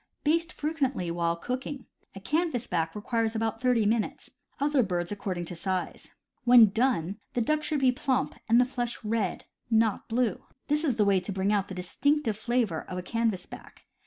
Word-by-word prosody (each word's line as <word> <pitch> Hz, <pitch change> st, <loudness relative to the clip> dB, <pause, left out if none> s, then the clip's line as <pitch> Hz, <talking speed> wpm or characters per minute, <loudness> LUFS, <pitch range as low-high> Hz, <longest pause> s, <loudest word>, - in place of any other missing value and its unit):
Baste 330 Hz, +3 st, +2 dB
frequently 270 Hz, -, -1 dB
while 170 Hz, 0 st, 0 dB
cooking. 255 Hz, +7 st, -5 dB, 0.3 s
A -, -, -6 dB
canvas 300 Hz, -, 0 dB
back 165 Hz, -3 st, -1 dB
requires 225 Hz, +1 st, -1 dB
about 225 Hz, +1 st, -1 dB
thirty 250 Hz, -4 st, +3 dB
minutes; 220 Hz, +1 st, -1 dB, 0.3 s
other 285 Hz, -1 st, +3 dB
birds 175 Hz, -4 st, -1 dB
accord 200 Hz, -3 st, -3 dB
ing 175 Hz, -, -3 dB
to 175 Hz, -, -6 dB
size. 185 Hz, +1 st, -3 dB, 0.4 s
When 240 Hz, -3 st, +8 dB
done, 210 Hz, -5 st, 0 dB, 0.2 s
the -, -, +2 dB
duck 305 Hz, +6 st, +1 dB
should 300 Hz, -2 st, -1 dB
be 260 Hz, -1 st, +5 dB
plump, 260 Hz, +1 st, 0 dB, 0.2 s
and 230 Hz, +2 st, +6 dB
the 250 Hz, -, +5 dB
flesh 245 Hz, -2 st, -4 dB
red, 215 Hz, -3 st, -1 dB, 0.2 s
not 225 Hz, -2 st, +2 dB
blue. 230 Hz, -3 st, 0 dB, 0.3 s
This 300 Hz, +2 st, +2 dB
is 275 Hz, -7 st, +1 dB
the 210 Hz, -3 st, +3 dB
way 195 Hz, -1 st, +4 dB
to 180 Hz, +3 st, -5 dB
bring 195 Hz, +2 st, 0 dB
out 200 Hz, -1 st, +1 dB
the 190 Hz, -, -7 dB
distinctive 250 Hz, +7 st, 0 dB
flavor 220 Hz, -6 st, 0 dB
of 180 Hz, -, -7 dB
a 180 Hz, -, -4 dB
canvasback. 225 Hz, -3 st, -3 dB
225 Hz, 185 wpm, -28 LUFS, 190-255 Hz, 0.4 s, When